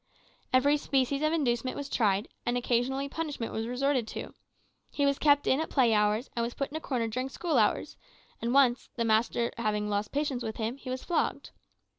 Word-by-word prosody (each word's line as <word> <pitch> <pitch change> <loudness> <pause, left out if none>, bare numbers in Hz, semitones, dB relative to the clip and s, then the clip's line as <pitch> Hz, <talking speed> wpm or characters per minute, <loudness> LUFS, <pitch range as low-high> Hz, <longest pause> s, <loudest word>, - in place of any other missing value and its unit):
Every 280 +3 +4
species 275 -1 0
of 310 0 +2
inducement 255 -6 0
was 285 - -4
tried, 210 -6 +1 0.2
and 240 +1 0
occasionally 250 +3 0
punishment 290 -6 -4
was 225 +1 -2
resorted 255 -1 0
to. - - -6 0.6
He 285 - 0
was 280 0 +1
kept 285 -1 +4
in 265 - +3
at 320 - -3
play 245 -5 +3
hours, 210 +3 +2
and 235 0 -2
put 275 0 -2
in - - -8
a - - -1
corner 245 -6 -1
during 255 +4 -3
school 335 +4 0
hours; - - +1 0.4
and 235 - -1
once, 260 -2 +3
the 235 - 0
master 230 +1 +2
having 210 -2 -1
lost 205 +1 -1
patience 280 -3 -1
with 220 -2 -4
him, 230 +3 -2
he 270 - -9
was 255 0 -4
flogged. 350 - -1
255 Hz, 195 wpm, -29 LUFS, 230-280 Hz, 0.6 s, Every